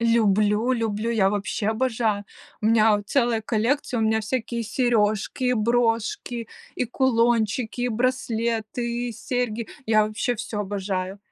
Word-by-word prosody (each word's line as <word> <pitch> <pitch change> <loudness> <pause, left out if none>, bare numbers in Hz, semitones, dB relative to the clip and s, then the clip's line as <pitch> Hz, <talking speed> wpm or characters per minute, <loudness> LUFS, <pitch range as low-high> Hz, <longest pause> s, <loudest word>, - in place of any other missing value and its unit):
Люблю 220 0 +3
люблю, 225 -1 -1
я 195 -4 +3
вообще 205 +1 -2
обожаю! 220 -3 0 0.4
У 215 - 0
меня 220 -1 +5
вот 205 -1 -8
целая 240 -4 +2
коллекция, 235 +4 0
у - - +1
меня 220 0 +2
всякие 235 +1 -2
сережки, 235 +2 +1
брошки, 230 0 0 0.3
и - - -1
кулончики, 235 -2 +1
и 245 - +1
браслеты, 235 0 -1
и 235 - -5
серьги. 235 -2 -3 0.2
Я 215 -1 +4
вообще 215 +3 -1
всё 210 -1 -4
обожаю! 190 -1 -3
225 Hz, 135 wpm, -24 LUFS, 215-240 Hz, 0.4 s, меня